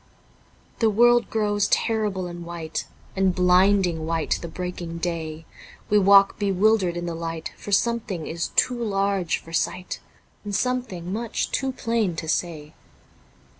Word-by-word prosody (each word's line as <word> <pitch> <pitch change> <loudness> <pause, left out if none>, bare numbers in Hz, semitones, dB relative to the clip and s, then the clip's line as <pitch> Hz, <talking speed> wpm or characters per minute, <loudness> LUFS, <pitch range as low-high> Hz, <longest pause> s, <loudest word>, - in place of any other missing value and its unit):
The 225 - +4
world 240 +3 +4
grows 205 -2 +1
terrible 210 -5 0
and 175 -1 -7
white. 170 -2 -5 0.3
And 190 -2 +2
blinding 180 -2 +3
white 165 -1 0
the 170 - -5
breaking 175 -1 -5
day, 165 -2 -4 0.5
We 210 - +6
walk 195 0 +6
bewildered 195 -2 +2
in 175 - -3
the 170 - -3
light, 165 -1 -5
For 205 - -9
something 200 -5 0
is 170 +1 -3
too 245 -2 +2
large 195 -4 0
for 165 - -13
sight. 180 +2 -2 0.4
And 205 -1 -4
something 200 -8 -2
much 230 +1 -2
too 270 0 0
plain 230 -7 -1
to 160 - -5
say. 155 -2 -2
185 Hz, 140 wpm, -24 LUFS, 170-210 Hz, 0.5 s, We